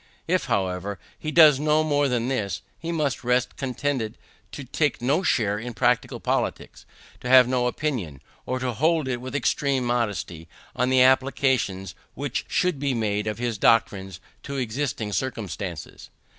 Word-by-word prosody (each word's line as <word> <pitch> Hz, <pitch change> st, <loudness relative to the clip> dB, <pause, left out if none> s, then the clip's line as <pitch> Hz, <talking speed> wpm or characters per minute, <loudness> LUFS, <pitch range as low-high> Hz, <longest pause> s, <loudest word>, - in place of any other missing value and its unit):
If, -, -, +1 dB
however, 95 Hz, +1 st, -1 dB, 0.2 s
he 155 Hz, -, -4 dB
does 155 Hz, -4 st, +7 dB
no 155 Hz, +1 st, +2 dB
more 145 Hz, -2 st, +2 dB
than 125 Hz, -2 st, 0 dB
this, 110 Hz, -7 st, -2 dB, 0.2 s
he 165 Hz, -, -4 dB
must 150 Hz, -6 st, -1 dB
rest 125 Hz, 0 st, +1 dB
contented 130 Hz, -3 st, -2 dB, 0.3 s
to 145 Hz, -, -7 dB
take 145 Hz, +3 st, 0 dB
no 135 Hz, +8 st, +1 dB
share 105 Hz, -, +1 dB
in 120 Hz, +1 st, -7 dB
practical 125 Hz, -1 st, +1 dB
politics; -, -, -3 dB, 0.3 s
to 125 Hz, -, -5 dB
have 130 Hz, -1 st, +8 dB
no 125 Hz, -1 st, +1 dB
opinion, 120 Hz, -, -3 dB, 0.3 s
or 130 Hz, -, -1 dB
to 130 Hz, -1 st, -2 dB
hold 155 Hz, +4 st, +1 dB
it 125 Hz, -2 st, -2 dB
with 130 Hz, +2 st, -6 dB
extreme 140 Hz, -2 st, 0 dB
modesty, 105 Hz, -9 st, -2 dB, 0.3 s
on 125 Hz, -, +1 dB
the 130 Hz, -1 st, +5 dB
applications 130 Hz, -8 st, +2 dB, 0.2 s
which 140 Hz, -1 st, -3 dB
should 180 Hz, -6 st, 0 dB
be 140 Hz, -2 st, 0 dB
made 105 Hz, -2 st, -1 dB
of 105 Hz, -, -2 dB
his 120 Hz, -3 st, -2 dB
doctrines 95 Hz, -5 st, +2 dB, 0.2 s
to 140 Hz, -, -6 dB
existing 120 Hz, -3 st, -2 dB
circumstances. 100 Hz, -, -5 dB
125 Hz, 155 wpm, -25 LUFS, 110-140 Hz, 0.3 s, have